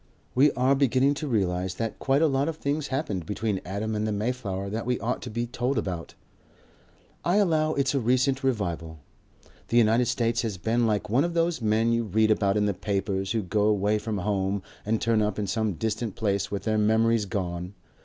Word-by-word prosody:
We 140 +3 +5
are 130 +2 +3
beginning 135 0 +3
to 155 - -3
realize 95 -6 0
that 115 +2 -4
quite 135 +3 +2
a - - +5
lot 140 +1 +1
of 160 - -5
things 145 0 -2
happened 105 - -3
between 105 -2 -2
Adam 100 +4 -3
and 105 0 -1
the - - -1
Mayflower 105 -3 -2
that 110 +4 -4
we 125 -1 0
ought 120 +3 -2
to 125 - -6
be 120 +2 -2
told 125 +2 -2
about. 90 -6 -4 1.1
I 175 - +2
allow 160 -6 +2
it's 135 -1 +1
a 140 - +2
recent 130 +3 +1
revival. 85 -10 -2 0.7
The 120 - +1
United 115 +1 +4
States 115 0 +1
has 110 -5 -3
been 115 +6 +1
like 105 -1 -1
one 125 +5 +4
of 170 0 -2
those 165 -3 +1
men 110 +1 +2
you 115 0 +1
read 110 +1 +2
about 100 -1 +2
in 105 - +2
the 100 - +1
papers 95 0 -2
who 110 -2 0
go 105 +3 +1
away 105 0 +2
from 105 0 -3
home 100 0 -1 0.2
and 110 0 +1
turn 115 -2 +2
up 105 -2 -1
in 105 - -1
some 110 +1 -1
distant 110 +3 -3
place 100 -2 -1
with 100 - -4
their 110 -1 +1
memories 110 +1 +3
gone. 90 -1 -4
110 Hz, 205 wpm, -26 LUFS, 100-125 Hz, 1.1 s, We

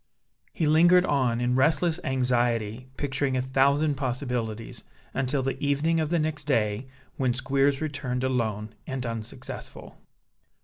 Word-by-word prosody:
He 165 - -1
lingered 175 +4 +6
on 130 -6 +1
in 125 0 +1
restless 160 +5 +2
anxiety, 120 -2 0
picturing 140 -1 -1
a - - +1
thousand 140 +3 +2
possibilities, 125 -4 -3 0.3
until 135 +1 0
the 135 +1 -3
evening 145 +4 +2
of 155 -2 0
the 170 - +2
next 155 -2 -2
day 115 -3 0 0.3
when 125 -3 +1
Squeers 135 +2 +1
returned 130 -5 -2
alone 110 -5 -1
and 130 -2 -3
unsuccessful. 115 -2 -7
130 Hz, 130 wpm, -27 LUFS, 120-145 Hz, 0.3 s, lingered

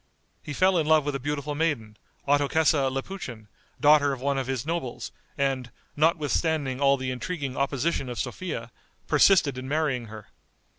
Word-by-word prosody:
He 145 - -6
fell 185 +3 +3
in 155 - -1
love 155 -2 +4
with 145 - -1
a 135 - -2
beautiful 145 +2 -3
maiden, 145 -9 -1 0.3
Ottokesa 145 0 +3
Lapuchin, 130 - -6 0.3
daughter 145 -1 +5
of 135 - -6
one 140 +1 0
of 130 - -3
his 130 -2 -2
nobles, 160 -6 -4 0.3
and, 135 -3 -1 0.3
notwithstanding 155 -3 +1
all 140 0 +4
the 130 -1 -3
intriguing 140 0 -4
opposition 140 0 -1
of 120 - -5
Sophia, 150 -11 -4 0.3
persisted 150 -10 +4
in 130 - -7
marrying 145 -4 0
her. 110 -3 -11
140 Hz, 155 wpm, -26 LUFS, 130-155 Hz, 0.3 s, daughter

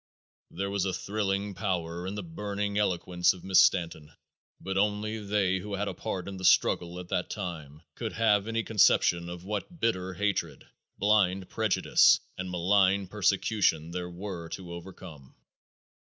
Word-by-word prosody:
'" - - -
There 100 +2 -4
was 100 -1 0
thrilling 100 -1 -2
power 90 -3 -3
in 100 - -4
the - - -4
burning 105 -11 -4
eloquence 90 -3 +1
of 90 - -13
Mrs. 95 0 -4
Stanton, 80 -4 +3 0.5
but 95 0 -4
only 105 +2 0
they 100 -2 0
who 100 +2 -5
had 100 +1 -2
a - - -3
part 90 0 -5
in 100 -1 -6
the 95 - -8
struggle 90 -1 +3
at 90 -1 -9
that 90 - -1
time 80 -4 -6
could 115 -2 -5
have 105 -2 +2
any 115 0 -1
conception 85 -5 +3
of 85 0 -8
what 105 - -5
bitter 95 -6 -1
hatred, 100 0 -2 0.3
blind 95 -2 +2
prejudice 110 -3 +4 0.2
and 90 0 -5
malign 95 +2 +2
persecution 95 -5 +1
there 90 0 -4
were 90 -2 -7
to 90 -1 -7
overcome. 85 -5 -11
95 Hz, 155 wpm, -28 LUFS, 90-105 Hz, 0.5 s, prejudice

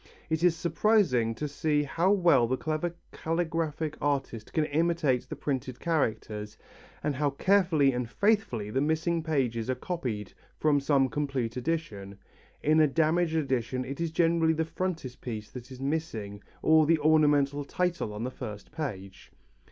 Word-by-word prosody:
It 160 +1 0
is 175 -2 +4
surprising 170 - +2
to 150 - -3
see 150 +1 0
how 165 +6 +1
well 175 -11 +4
the 130 +2 0
clever 160 +4 -2 0.2
calligraphic 160 -2 -2
artist 135 -6 -2
can 155 - +1
imitate 155 -4 +1
the - - -4
printed 130 -3 -3
characters, 110 -9 -2 0.5
and 150 - 0
how 145 +2 +1
carefully 160 -3 +3
and 125 -1 -3
faithfully 200 - +1
the 130 - 0
missing 160 +3 0
pages 130 -8 -1
are 130 - +1
copied 125 - -4 0.2
from 150 -2 +3
some 140 -1 +3
complete 135 -5 -2
edition. 120 -9 -3 0.5
In 155 +2 +4
a 155 - +6
damaged 160 +3 +1
edition 130 -4 -1
it 135 +5 -5
is 170 - 0
generally 165 0 +2
the 160 0 -1
frontispiece 130 -10 -5
that 125 0 -9
is 130 - -9
missing 135 -9 -3 0.2
or 155 -1 +5
the 165 0 +4
ornamental 145 -2 +3
title 175 -5 -1
on 105 +2 -5
the 130 - -3
first 105 -4 -8
page. 105 - -6
145 Hz, 150 wpm, -28 LUFS, 125-165 Hz, 0.5 s, a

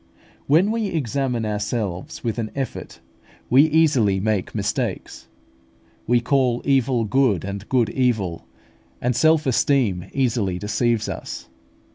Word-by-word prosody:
When 170 +9 +4
we 225 -2 -1
examine 135 - -1
ourselves 105 -3 -3
with 115 -1 -2
an 110 -2 -3
effort, 135 -2 -5 0.5
we 140 +5 +6
easily 140 -11 +3
make 105 -1 -1
mistakes. - - -3 0.8
We 120 0 +4
"call 125 -1 +1
evil 130 -4 +2
good, 110 -5 +1
and 100 +1 -6
good 120 -4 +2
evil;" 110 -10 -1 0.5
and 125 0 0
self 160 +3 +3
esteem 125 -8 +1
easily 115 -9 0
deceives 110 +3 0
us. - - -7
120 Hz, 120 wpm, -22 LUFS, 105-135 Hz, 0.8 s, we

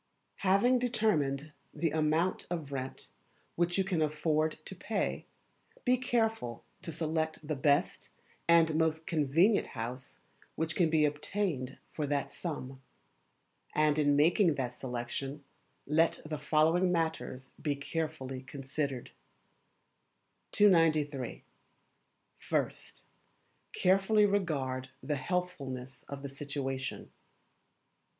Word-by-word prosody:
Having 200 +7 +4
determined 155 - +1 0.2
the 155 +1 0
Amount 160 +3 +1
of 160 -5 -4
Rent 130 -1 -5 0.5
which 175 +1 +1
you 195 - +3
can 185 -4 0
afford 155 +1 +1
to - - -5
pay, - - -2 0.6
be 250 0 +5
careful 225 - 0 0.2
to 180 -3 -5
select 160 -1 -2
the 155 - -1
best 140 +1 +1 0.4
and 165 -1 +6
most 160 0 +1
convenient 165 +7 +3
house 125 +3 -5 0.4
which 160 0 0
can 170 -3 +3
be 155 -1 +4
obtained 150 -3 -2
for 150 -2 -2
that 140 0 -1
sum. 135 -6 -5 0.9
And 155 0 +3
in 145 -1 +4
making 165 +3 +4
that 125 -3 -2
selection 130 +3 -4 0.4
let 160 +3 +3
the 155 -1 -4
following 160 +5 +3
matters 160 -6 -2
be 145 -2 0
carefully 140 -3 -3
considered: 135 -1 -4 1.4
293. 155 - +3 1.0
First - - -2 0.7
Carefully 195 +3 +4
regard 140 -10 0
the 150 -1 -1
Healthfulness 135 -5 -3
of 140 0 -6
the 140 - -4
Situation. 135 -1 -4
155 Hz, 105 wpm, -32 LUFS, 140-170 Hz, 1.4 s, and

